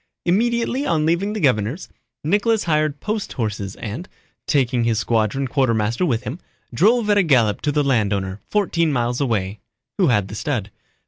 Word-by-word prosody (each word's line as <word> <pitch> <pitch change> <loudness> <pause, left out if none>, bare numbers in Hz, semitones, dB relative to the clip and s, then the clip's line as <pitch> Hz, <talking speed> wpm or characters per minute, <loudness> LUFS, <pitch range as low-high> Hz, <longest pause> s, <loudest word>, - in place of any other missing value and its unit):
Immediately 235 +8 +1
on 155 -2 +1
leaving 175 +6 +1
the 215 - -3
governor's, 125 - 0 0.4
Nicholas 210 +7 +2
hired 155 -3 0
post 215 -1 -3
horses 105 -5 -3
and, 120 - -6 0.4
taking 125 -4 +2
his 115 -1 +1
squadron 115 +4 0
quartermaster 120 +2 +1
with 120 -4 0
him, 135 +7 -5 0.3
drove 215 - +3
at 205 - +4
a - - +6
gallop 125 - +2
to 150 - 0
the 145 0 +1
landowner, 100 -7 0
fourteen 170 -6 +1
miles 120 -1 -1
away, 105 -6 -1 0.4
who 185 - +4
had 105 -7 +2
the 100 - -9
stud. 110 -3 -3
135 Hz, 165 wpm, -21 LUFS, 110-175 Hz, 0.4 s, a